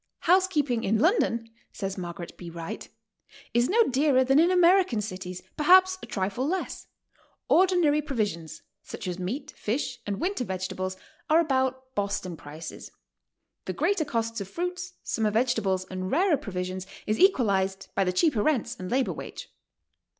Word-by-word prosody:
"Housekeeping 320 -10 +2
in 215 +3 +2
London," 235 - +1 0.2
says 195 -2 -4
Margaret 175 -1 -7
B. 175 - -9
Wright, 165 0 -7 0.6
"is 240 +1 +3
no 460 +5 +5
dearer 270 - +3
than 270 +3 +4
in 335 +2 +5
American 360 - +4
cities, 185 -3 -6
perhaps 370 +4 +6
a - - -8
trifle 200 +7 -2
less. 375 +3 -3 0.6
Ordinary 350 -5 +4
provisions, 210 - -3 0.2
such - - -8
as 180 0 -3
meat, 205 +11 -4
fish 245 +2 -2
and 200 -1 -2
winter 370 -7 -1
vegetables, 185 -1 -4 0.3
are 315 +2 +6
about 260 -4 0
Boston 200 -4 -2
prices; 155 +1 -9 0.8
the - - -3
greater 400 -5 +1
cost 230 -5 -2
of 195 - -5
fruits, 360 - -4
summer 220 -2 0
vegetables 210 -5 +1
and 185 0 -3
rarer 345 - +3
provisions 185 -3 -5 0.2
is 215 +1 -1
equalized 195 - +2
by 195 - +2
the 180 - +1
cheaper 240 - +2
rents 280 -2 0
and 185 -1 -5
labor 260 +1 +1
wage. - - -9
235 Hz, 150 wpm, -27 LUFS, 190-310 Hz, 0.8 s, perhaps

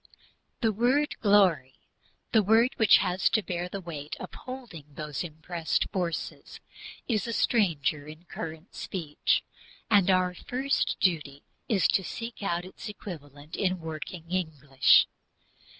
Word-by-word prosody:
The 225 - +3
word 250 +8 +2
"glory" 185 - +4 0.6
the 220 - +5
word 225 +4 +4
which 220 - +7
has 180 +1 +1
to 220 - +1
bear 175 -1 -3
the 200 - -5
weight 155 -5 -6
of - - -8
holding 245 - -8
those 150 0 -4
"impressed 165 +1 -2
forces" 175 -4 -4 0.5
is 225 -1 0
a 230 - -2
stranger 155 - +1
in 155 +2 -11
current 160 +1 -7
speech, 160 -6 -1 0.5
and 200 -3 +5
our 185 -1 +3
first 260 +9 -1
duty 150 -6 0 0.3
is 200 -5 +4
to 190 - +2
seek 230 +8 -6
out 175 -3 -1
its 190 +3 -9
equivalent 150 -7 -9
in 185 -1 0
working 160 +1 -6
English. 150 -7 +4
180 Hz, 135 wpm, -28 LUFS, 155-210 Hz, 0.6 s, which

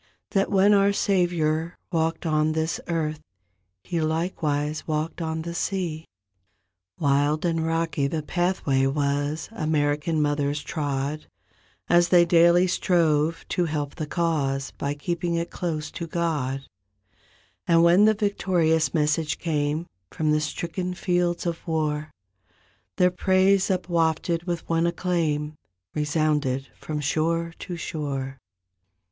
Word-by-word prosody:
That 195 -1 +1
when 200 +1 +5
our 200 0 +4
Savior 170 -4 +1
walked 165 0 0
on 155 -1 +2
this 160 +1 -1
earth. 155 -3 -1 0.6
He 170 -2 -2
likewise 155 -2 -1
walked 155 +2 -2
on 160 0 -2
the 170 0 -5
sea.'^ 170 -3 -2 0.9
40 140 -3 +3
Wild 145 +3 +1
and 165 -1 +1
rocky 165 -3 0
the 155 +1 -3
pathway 155 -6 +1
was 145 +2 -1
American 155 -3 0
mothers 145 0 0
trod 145 0 -3 0.6
As 175 0 +4
they 175 -1 +6
daily 170 +1 +5
strove 165 -3 +1
to 175 - +1
help 150 -3 -3
the 155 -3 -5
cause 145 -5 -1
By 140 +1 -3
keeping 170 +3 -2
it 170 +1 -2
close 155 -3 -3
to 170 - -5
God; 150 -6 -1 1.1
And 165 0 +5
when 175 +5 +6
the 215 0 +4
victorious 180 -6 +1
message 150 0 +1
came 155 0 -1 0.2
From 155 -1 0
the 150 0 +2
stricken 180 +4 -3
fields 175 -1 0
of 170 0 -4
war 155 -2 -1 0.9
Their 180 0 +4
praise 190 +1 +3
upwafted 170 -2 0
with 175 -2 -3
one 165 0 +2
acclaim 160 -4 -1 0.4
Resounded 150 -3 0
from 150 -1 -5
shore 165 +3 0
to 180 - -5
shore. 135 -4 -4
160 Hz, 125 wpm, -25 LUFS, 150-175 Hz, 1.1 s, they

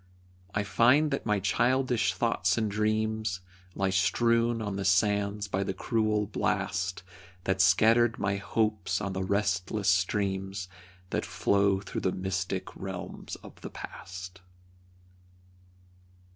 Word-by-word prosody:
I 100 - +1
find 125 +9 +4
that 135 - -2
my 105 -2 +2
childish 120 0 +1
thoughts 95 -6 +1
and 110 -2 0
dreams 110 -1 0 0.3
Lie 95 -1 0
strewn 115 +4 +2
on 105 -3 -3
the 100 - -2
sands 100 +2 +2
by 95 0 -1
the 95 - -3
cruel 110 0 +1
blast 95 -1 -1 0.4
That 95 0 +1
scattered 110 +5 +4
my 100 +1 0
hopes 105 -2 0
on 100 -2 -3
the 95 0 -2
restless 100 0 0
streams 95 +1 0 0.4
That - - 0
flow 100 -1 +2
through 100 - -5
the 95 - +1
mystic 95 0 -3
realms 95 -2 -6
of - - -13
the - - -6
past. 90 +1 -9
100 Hz, 125 wpm, -29 LUFS, 95-110 Hz, 0.4 s, find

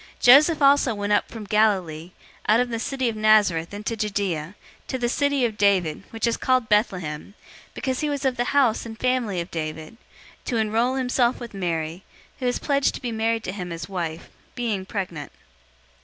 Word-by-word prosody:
002:004 - - -33
Joseph 295 +5 +7
also 275 -4 +4
went 205 0 -1
up - - +1
from 225 -2 -8
Galilee, 190 -6 +1 0.4
out 220 +2 +5
of 250 0 +1
the 230 -1 -3
city 260 +1 -2
of 230 - -1
Nazareth, 210 -6 +3
into 210 +3 -4
Judea, 195 -6 -2 0.3
to 260 - -2
the 245 -1 -1
city 285 +1 +1
of 220 -3 -4
David, 185 -7 +2
which 225 0 -3
is 235 - +1
called 255 -3 +1
Bethlehem, 190 -5 -1 0.4
because 260 -2 -2
he 300 - -1
was 285 -1 -3
of 260 -1 +1
the 245 - -1
house 260 -5 +2
and 225 -1 -8
family 250 -7 0
of 170 +1 -5
David; 155 +3 -5 0.4
002:005 - - -34
to 240 - -1
enroll 225 +4 +1
himself 250 -1 +1
with 240 -3 -8
Mary, 170 -2 -3 0.4
who 255 - -1
was 245 - +1
pledged 280 -2 +1
to - - -7
be 240 - -2
married 225 0 0
to - - -3
him 180 -3 -6
as 165 -1 -6
wife, 170 -4 -5 0.2
being 215 -6 -2
pregnant. 175 -9 -5
215 Hz, 195 wpm, -24 LUFS, 185-245 Hz, 0.4 s, Joseph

